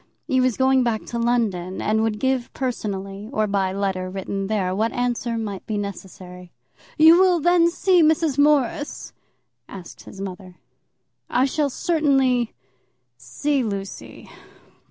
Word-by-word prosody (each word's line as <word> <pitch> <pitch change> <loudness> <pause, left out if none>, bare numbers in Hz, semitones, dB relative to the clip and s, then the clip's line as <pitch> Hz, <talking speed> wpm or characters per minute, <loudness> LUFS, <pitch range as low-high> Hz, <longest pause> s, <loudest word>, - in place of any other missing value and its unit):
He 260 -1 +1
was 255 -3 +1
going 265 0 +3
back 235 -3 -1
to 235 - -4
London, 210 -7 -1
and 220 +1 +1
would 220 -1 0
give 260 -1 -1
personally, 200 -5 -4
or 215 -5 0
by 200 -2 0
letter 190 -1 -2
written 195 +1 -4
there, 195 -3 -1
what 220 +4 0
answer 240 -1 -2
might 205 -4 -5
be 215 - -2
necessary. 180 -3 -8 0.5
"You 320 +3 +7
will 370 -2 +4
then 345 +1 +4
see 360 +1 +3
Miss 315 -2 +2
Morris?" 290 -1 +1 0.6
asked 185 -3 -11
his 195 - -12
mother. 185 -1 -8 0.7
"I 255 - +2
shall 285 +1 0
certainly 270 -6 +1 0.6
see 290 -2 -1
Lucy. 200 -4 -6
230 Hz, 135 wpm, -22 LUFS, 195-270 Hz, 0.7 s, You